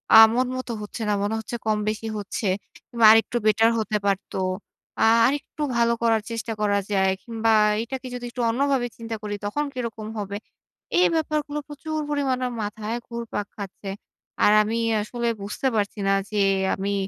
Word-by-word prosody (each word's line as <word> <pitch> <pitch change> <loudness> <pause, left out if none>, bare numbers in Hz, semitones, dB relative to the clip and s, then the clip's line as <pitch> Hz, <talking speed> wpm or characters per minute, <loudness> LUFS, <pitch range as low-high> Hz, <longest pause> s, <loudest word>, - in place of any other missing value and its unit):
আ - - +12 0.2
মন 250 +2 +2
মতো 255 -1 -4
হচ্ছে 210 +3 -7
না। - - +3
মনে 205 +2 0
হচ্ছে 220 +2 -6
কম 215 -1 +2
বেশি 215 +1 -3
হচ্ছে। 205 +1 -3 0.3
কিংবা 235 -2 0
আরেকটু 225 +2 +4
বেটার 225 +1 +5
হতে 215 -1 0
পারতো। 195 -1 -1 0.6
আ - - +5 0.2
আরেকটু 290 +3 -3 0.2
ভালো 235 0 +3
করার 225 -2 +3
চেষ্টা 230 0 -3
করা 205 -1 +2
যায় 190 -1 +3
কিংবা 225 -1 0 0.3
এটাকে 260 +2 -6
যদি 245 0 -5
একটু 245 +1 -5
অন্য 235 +4 -1
ভাবে 255 -3 +1
চিন্তা 230 -1 -5
করি 205 -1 -3
তখন 290 +9 -1
কিরকম 230 -4 -5
হবে? 200 -1 -3 0.6
এই 365 - +6
ব্যাপারগুলো 300 -2 -1
প্রচুর 310 +1 -4
পরিমাণে 265 -3 0 0.2
মাথায় 210 +2 -4
ঘুরপাক 235 -3 -4
খাচ্ছে। 200 -1 -7 0.5
আর 210 - +6
আমি 220 +2 -2 0.2
আসলে 235 +2 -3
বুঝতে 205 +6 -2
পারছি 205 0 -1
না 195 - +4 0.2
যে 210 -1 +1 0.3
আমি 200 +1 -2
225 Hz, 170 wpm, -24 LUFS, 210-250 Hz, 0.6 s, আ